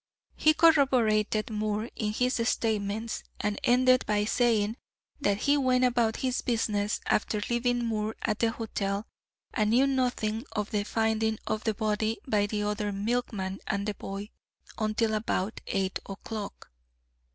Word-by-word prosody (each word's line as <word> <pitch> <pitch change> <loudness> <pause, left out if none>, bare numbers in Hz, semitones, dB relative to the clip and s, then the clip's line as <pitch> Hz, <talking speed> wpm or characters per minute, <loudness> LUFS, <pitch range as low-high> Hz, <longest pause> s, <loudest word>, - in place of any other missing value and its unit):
He 310 0 +4
corroborated 235 -10 +3
Moore 215 +1 -1
in 210 -2 -1
his 250 +2 +1
statements, 220 0 -1 0.2
and 210 0 -1
ended 255 +1 +4
by 210 -1 +2
saying 225 -1 +2 0.4
that 205 -7 +1
he 285 +1 +3
went 255 -2 +3
about 240 -3 +2
his 255 -1 0
business 210 -3 0
after 210 0 +1
leaving 240 0 +1
Moore 220 -1 -1
at 215 -1 0
the 230 - +3
hotel, 205 -3 -3 0.5
and 215 -3 +1
knew 250 +5 +5
nothing 245 -5 0
of 210 -2 -2
the 205 -1 0
finding 220 0 +1
of 215 0 -2
the 220 -2 +1
body 215 +1 0
by 205 -4 +2
the 210 0 -2
other 210 0 -1
milkman 200 -2 -2
and 200 +1 -1
the 210 - 0
boy, 200 +2 -7 0.5
until 215 +1 +1
about 215 -1 -1
eight 190 -1 -1
o'clock. 200 +1 -7
220 Hz, 145 wpm, -28 LUFS, 210-240 Hz, 0.5 s, knew